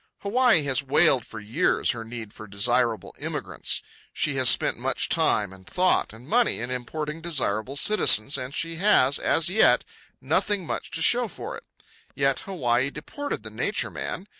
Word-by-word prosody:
Hawaii 225 Hz, -, +3 dB
has 140 Hz, -2 st, +1 dB
wailed 135 Hz, -2 st, +3 dB
for 110 Hz, -, -9 dB
years 105 Hz, +2 st, 0 dB
her 115 Hz, -2 st, -6 dB
need 115 Hz, -2 st, -9 dB
for 110 Hz, -, -11 dB
desirable 115 Hz, +3 st, 0 dB
immigrants. -, -, -3 dB, 0.3 s
She 155 Hz, -, 0 dB
has 130 Hz, -2 st, +5 dB
spent -, -, +2 dB
much -, -, -1 dB
time, 100 Hz, -3 st, +1 dB
and 95 Hz, -1 st, -17 dB
thought, 185 Hz, 0 st, +1 dB
and 115 Hz, +4 st, -14 dB
money, 235 Hz, -, +1 dB
in 120 Hz, +2 st, -5 dB
importing 150 Hz, +5 st, -5 dB
desirable 135 Hz, -7 st, -2 dB
citizens, 140 Hz, -, +4 dB
and 130 Hz, -1 st, -4 dB
she 165 Hz, +3 st, -4 dB
has, 145 Hz, -8 st, +3 dB
as 165 Hz, -, +2 dB
yet, 195 Hz, +5 st, +3 dB, 0.4 s
nothing 205 Hz, -4 st, 0 dB
much -, -, -4 dB
to 165 Hz, -, -2 dB
show 245 Hz, +3 st, +4 dB
for 195 Hz, -, -8 dB
it. -, -, -12 dB, 0.5 s
Yet 135 Hz, -1 st, +1 dB
Hawaii 130 Hz, -8 st, -1 dB
deported 285 Hz, -, -6 dB
the -, -, -8 dB
Nature -, -, -2 dB
Man. 195 Hz, -, -6 dB
140 Hz, 165 wpm, -25 LUFS, 120-175 Hz, 0.5 s, has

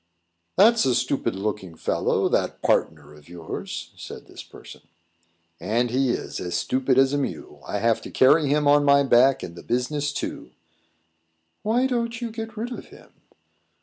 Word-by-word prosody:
"That's 225 Hz, +4 st, +6 dB
a 125 Hz, -, +2 dB
stupid 120 Hz, -2 st, -1 dB
looking 95 Hz, -3 st, -4 dB
fellow, -, -, 0 dB
that -, -, -1 dB
partner 75 Hz, -2 st, 0 dB
of 75 Hz, +1 st, -17 dB
yours," 85 Hz, -2 st, -7 dB
said -, -, -10 dB
this -, -, -11 dB
person. -, -, -14 dB, 0.8 s
"And 120 Hz, +2 st, 0 dB
he 130 Hz, +1 st, +1 dB
is -, -, -3 dB
as 90 Hz, -1 st, -4 dB
stupid 130 Hz, 0 st, 0 dB
as 135 Hz, +1 st, +4 dB
a 145 Hz, -, +1 dB
mule. 140 Hz, -, -5 dB
I -, -, -2 dB
have 115 Hz, +2 st, +1 dB
to -, -, -9 dB
carry 145 Hz, +3 st, +4 dB
him 145 Hz, +1 st, +2 dB
on 145 Hz, 0 st, +5 dB
my 140 Hz, 0 st, +5 dB
back, 130 Hz, 0 st, +4 dB
and 85 Hz, -, -7 dB
the 85 Hz, -, -10 dB
business, 145 Hz, +4 st, -1 dB
too." 140 Hz, -, -6 dB, 1.1 s
"Why 235 Hz, +4 st, +1 dB
don't 235 Hz, -2 st, -1 dB
you 235 Hz, -2 st, -4 dB
get 225 Hz, 0 st, -7 dB
rid 235 Hz, +3 st, -4 dB
of 245 Hz, -, -7 dB
him?" -, -, -17 dB
135 Hz, 170 wpm, -24 LUFS, 115-155 Hz, 1.1 s, That's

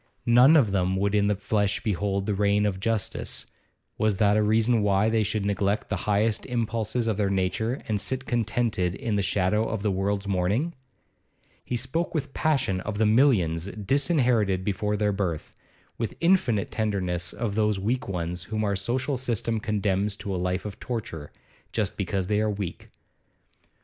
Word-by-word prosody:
None 125 Hz, +6 st, +7 dB
of 115 Hz, -9 st, +3 dB
them 95 Hz, -1 st, +1 dB
would 100 Hz, +1 st, 0 dB
in 100 Hz, -1 st, +3 dB
the 105 Hz, -, +2 dB
flesh 100 Hz, 0 st, 0 dB
behold 100 Hz, -1 st, -1 dB
the 105 Hz, -, 0 dB
reign 100 Hz, +1 st, +2 dB
of 95 Hz, -2 st, -1 dB
justice; 110 Hz, 0 st, -2 dB, 0.5 s
was 110 Hz, -3 st, +2 dB
that 105 Hz, 0 st, +3 dB
a 110 Hz, -, +3 dB
reason 110 Hz, +2 st, +3 dB
why 100 Hz, +1 st, +3 dB
they 110 Hz, 0 st, +2 dB
should 105 Hz, 0 st, -1 dB
neglect 100 Hz, +1 st, 0 dB
the -, -, 0 dB
highest 105 Hz, +1 st, +2 dB
impulses 115 Hz, -1 st, -1 dB
of 110 Hz, -3 st, 0 dB
their 100 Hz, -2 st, +1 dB
nature 100 Hz, +6 st, -1 dB
and 105 Hz, -3 st, 0 dB
sit 130 Hz, 0 st, -2 dB
contented 110 Hz, -6 st, 0 dB
in 115 Hz, -6 st, -2 dB
the 100 Hz, -, +1 dB
shadow 100 Hz, +3 st, +1 dB
of 110 Hz, -3 st, -3 dB
the 105 Hz, -, +1 dB
world's 100 Hz, +1 st, -1 dB
mourning? 100 Hz, -, 0 dB, 0.9 s
He 125 Hz, -, -3 dB
spoke 140 Hz, +9 st, -2 dB
with 140 Hz, -3 st, -2 dB
passion 135 Hz, -12 st, +1 dB
of 105 Hz, +1 st, -4 dB
the 110 Hz, -, +3 dB
millions 105 Hz, -, +3 dB
disinherited 115 Hz, -, +1 dB
before 105 Hz, +1 st, -1 dB
their 105 Hz, 0 st, +1 dB
birth, 90 Hz, -6 st, -3 dB, 0.4 s
with 115 Hz, -2 st, -3 dB
infinite 165 Hz, -, +2 dB
tenderness 90 Hz, -5 st, -1 dB
of 115 Hz, -3 st, -3 dB
those 105 Hz, -1 st, +1 dB
weak 120 Hz, +6 st, -1 dB
ones 90 Hz, -1 st, -3 dB
whom 110 Hz, +1 st, -2 dB
our 100 Hz, -1 st, 0 dB
social 125 Hz, +7 st, -1 dB
system 115 Hz, -2 st, -1 dB
condemns 105 Hz, -1 st, 0 dB
to 100 Hz, -1 st, -5 dB
a -, -, -1 dB
life 90 Hz, +1 st, -1 dB
of 105 Hz, -2 st, -6 dB
torture, 90 Hz, -11 st, -5 dB, 0.4 s
just 105 Hz, -4 st, -1 dB
because 95 Hz, -1 st, -1 dB
they 105 Hz, +2 st, +1 dB
are 110 Hz, -, +1 dB
weak. 100 Hz, -4 st, -5 dB
105 Hz, 175 wpm, -26 LUFS, 95-115 Hz, 0.9 s, None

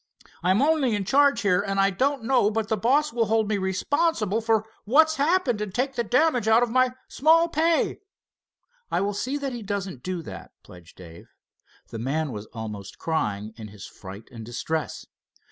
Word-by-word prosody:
I'm 185 Hz, +8 st, +3 dB
only 290 Hz, -7 st, +2 dB
in 200 Hz, -2 st, -2 dB
charge 275 Hz, +1 st, +3 dB
here, 200 Hz, -2 st, +2 dB
and 195 Hz, -1 st, -2 dB
I 195 Hz, 0 st, +4 dB
don't 265 Hz, +6 st, 0 dB
know 245 Hz, -3 st, +3 dB
but 220 Hz, 0 st, -2 dB
the 220 Hz, -, +2 dB
boss 270 Hz, +8 st, +1 dB
will 230 Hz, -2 st, +1 dB
hold 220 Hz, 0 st, +1 dB
me 205 Hz, -1 st, 0 dB
responsible 215 Hz, -, 0 dB
for 220 Hz, -1 st, +1 dB, 0.2 s
what's 315 Hz, +8 st, +4 dB
happened 285 Hz, -, +1 dB
and 210 Hz, -2 st, -3 dB
take 260 Hz, +6 st, -1 dB
the 240 Hz, -2 st, -1 dB
damage 250 Hz, 0 st, +2 dB
out 225 Hz, +2 st, +5 dB
of 240 Hz, -, -2 dB
my 255 Hz, 0 st, +3 dB
small 325 Hz, +3 st, +4 dB
pay." 330 Hz, +1 st, +1 dB, 0.9 s
"I -, -, 0 dB
will 200 Hz, +1 st, -1 dB
see 255 Hz, +8 st, -2 dB
that 275 Hz, -2 st, -4 dB
he 240 Hz, -, -6 dB
doesn't 195 Hz, -, -4 dB
do 180 Hz, 0 st, -4 dB
that," -, -, -10 dB
pledged 90 Hz, -2 st, -15 dB
Dave. 85 Hz, -2 st, -13 dB, 0.6 s
The 115 Hz, -, -7 dB
man 145 Hz, +5 st, -2 dB
was 105 Hz, -1 st, -7 dB
almost 105 Hz, -4 st, -8 dB
crying 110 Hz, -10 st, -2 dB
in 110 Hz, -2 st, -8 dB
his 105 Hz, -1 st, -11 dB
fright 100 Hz, +2 st, -11 dB
and 115 Hz, -2 st, -9 dB
distress. 150 Hz, +7 st, -4 dB
215 Hz, 185 wpm, -25 LUFS, 160-265 Hz, 0.9 s, out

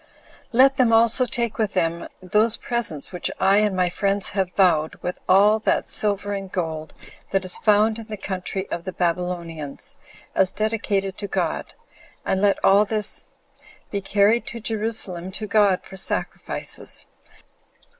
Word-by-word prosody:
Let 265 Hz, +3 st, +5 dB
them 245 Hz, -3 st, +3 dB
also 230 Hz, +2 st, +4 dB
take 235 Hz, -2 st, -3 dB
with 215 Hz, -3 st, 0 dB
them 170 Hz, -2 st, -1 dB, 0.2 s
those 215 Hz, +5 st, +2 dB
presents 230 Hz, -, -1 dB
which 180 Hz, -2 st, -2 dB
I 195 Hz, +1 st, +4 dB
and 210 Hz, -2 st, +2 dB
my 180 Hz, -1 st, +2 dB
friends 200 Hz, +1 st, +2 dB
have 190 Hz, -2 st, -1 dB
vowed, 165 Hz, -5 st, +3 dB
with 180 Hz, -, -4 dB
all 205 Hz, +3 st, +5 dB
that -, -, 0 dB
silver 205 Hz, -1 st, 0 dB
and 195 Hz, -1 st, -5 dB
gold 160 Hz, -3 st, -4 dB, 0.3 s
that 195 Hz, -1 st, 0 dB
is 185 Hz, -, 0 dB
found 215 Hz, +1 st, +3 dB
in 225 Hz, -, -9 dB
the 215 Hz, -1 st, -6 dB
country 190 Hz, 0 st, -4 dB
of 170 Hz, -, -3 dB
the 185 Hz, -, -6 dB
Babylonians, 170 Hz, -4 st, -3 dB, 0.4 s
as 190 Hz, -1 st, +3 dB
dedicated 205 Hz, -3 st, -1 dB
to 205 Hz, -, -4 dB
God, -, -, -3 dB, 0.5 s
and 190 Hz, -, 0 dB
let 200 Hz, -1 st, +3 dB
all 200 Hz, +2 st, +6 dB
this 210 Hz, 0 st, -2 dB, 0.6 s
be 200 Hz, -, -2 dB
carried 205 Hz, +4 st, +2 dB
to 235 Hz, -, -6 dB
Jerusalem 215 Hz, -5 st, -1 dB
to 215 Hz, -, -3 dB
God 200 Hz, -3 st, +3 dB
for 190 Hz, -, -11 dB
sacrifices. 190 Hz, -, -2 dB
200 Hz, 155 wpm, -23 LUFS, 185-215 Hz, 0.6 s, all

